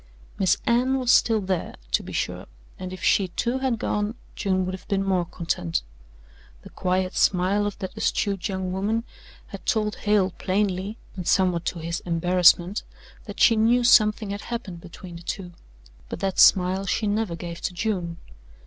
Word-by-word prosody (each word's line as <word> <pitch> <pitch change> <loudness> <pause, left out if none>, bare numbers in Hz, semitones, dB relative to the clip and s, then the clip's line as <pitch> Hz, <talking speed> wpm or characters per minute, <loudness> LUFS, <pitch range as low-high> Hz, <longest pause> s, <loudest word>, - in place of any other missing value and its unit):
Miss 190 0 +3
Anne 250 +3 +2
was 250 -2 +2
still 225 -2 +4
there, 185 -3 -2 0.2
to - - +2
be - - -9
sure, - - -3 0.3
and 185 0 -6
if 185 - -8
she, 195 - +3
too, 240 +8 -2
had 260 -3 0
gone, 210 +1 -2 0.2
June 185 -3 0
would 185 - -3
have 185 - -9
been 195 -1 0
more 185 -3 +1
content. 90 - -2 0.8
The - - -12
quiet 185 +1 -1
smile 195 +3 +2
of 205 - -5
that 190 0 -6
astute 200 -3 -1
young 190 -1 -3
woman 210 +5 -1 0.5
had - - -9
told 215 -2 0
Hale 205 -3 +2
plainly, 195 +2 -1 0.2
and 180 -3 -6
somewhat 180 -3 +2
to - - -2
his 170 +1 -3
embarrassment, 180 +2 +3 0.4
that - - -9
she 230 - +6
knew 235 +3 +3
something 215 -3 +4
had 200 +1 -4
happened 195 -8 -6
between 175 0 -10
the - - -12
two, 180 +1 -5 0.6
but - - -5
that 195 -1 -2
smile 190 +1 +5
she 215 - 0
never 205 -3 -1
gave 170 0 -7
to - - -2
June. 180 -3 -2
190 Hz, 175 wpm, -24 LUFS, 180-210 Hz, 0.8 s, she